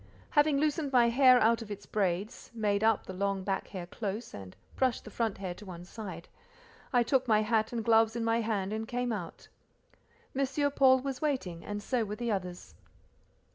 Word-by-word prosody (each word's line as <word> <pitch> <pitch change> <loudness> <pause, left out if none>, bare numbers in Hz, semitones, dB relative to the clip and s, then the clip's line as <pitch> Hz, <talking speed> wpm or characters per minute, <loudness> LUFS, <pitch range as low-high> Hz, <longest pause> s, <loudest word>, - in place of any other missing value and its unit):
Having 295 -1 +3
loosened 300 -1 0
my 240 -2 +5
hair 255 +1 +6
out 230 +1 +3
of 225 - -8
its 205 -1 -7
braids, 195 +1 -2
made 205 -2 0
up 225 -1 +3
the 190 - -7
long 195 0 -1
back 195 0 -2
hair 185 -3 -6
close, 210 +4 -5
and 95 -2 -9 0.2
brushed 260 -2 0
the 215 - -9
front 225 -1 -1
hair 185 -2 -4
to 195 - -13
one 175 -3 -9
side, 185 -4 -8 0.6
I 245 -3 +4
took 260 +1 +1
my 215 -1 +4
hat 220 0 +1
and 230 -3 -3
gloves 225 0 +4
in 235 - -2
my 230 +1 +2
hand 210 -3 -1
and 220 +1 -3
came 245 0 -2
out. 180 -7 -6 0.9
M. 275 +2 0
Paul 260 -2 +5
was 270 -1 -4
waiting, 255 - -2
and 205 0 -5
so 250 0 0
were 210 0 -4
the 235 0 -2
others. 180 -3 -4
220 Hz, 195 wpm, -30 LUFS, 200-250 Hz, 0.9 s, hair